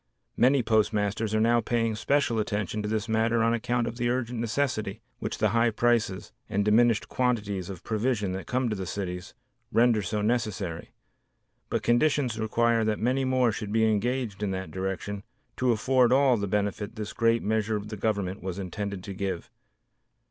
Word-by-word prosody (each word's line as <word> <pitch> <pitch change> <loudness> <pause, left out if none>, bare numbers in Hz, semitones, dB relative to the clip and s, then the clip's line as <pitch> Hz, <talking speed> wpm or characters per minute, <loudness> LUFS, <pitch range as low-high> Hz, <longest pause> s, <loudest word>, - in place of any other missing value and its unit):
Many 130 +1 +4
postmasters 110 -1 +1
are - - +3
now 115 +1 +3
paying 115 0 0
especial 115 +1 +1
attention 105 0 -2
to 105 - -3
this 110 0 -1
matter 115 +1 +2
on 115 +1 +3
account 120 +1 0
of 115 0 -5
the 120 -1 0
urgent 120 -1 -1
necessity 115 -3 -1 0.2
which - - -4
the - - +2
high 115 0 +3
prices, 115 -4 0 0.2
and 100 0 0
diminished 115 0 +3
quantities 105 -7 -1
of 95 -4 -8
provision 110 -3 0
that 95 +1 -5
come 130 0 0
to 110 - -1
the 95 -2 -5
cities, 90 0 -5 0.4
render 115 -2 +4
so 105 +2 -2
necessary, 105 -7 -2 0.8
but - - -1
conditions 120 -1 +2
require 115 +1 +2
that 110 -1 0
many 130 +3 +1
more 130 -2 +3
should 105 -1 -5
be 110 +1 +3
engaged 110 0 0
in 105 - 0
that 95 0 -4
direction 95 +2 -3 0.4
to 125 -1 +2
afford 125 +2 +3
all 135 -1 +5
the 100 -3 -2
benefit 105 +2 -2
this 105 -2 -5
great 115 0 +2
measure 110 0 0
of 105 0 -4
the 110 - -5
Government 100 -3 -2
was 90 0 -4
intended 100 0 -4
to 100 - -6
give. 95 -2 -4
110 Hz, 175 wpm, -27 LUFS, 100-120 Hz, 0.8 s, all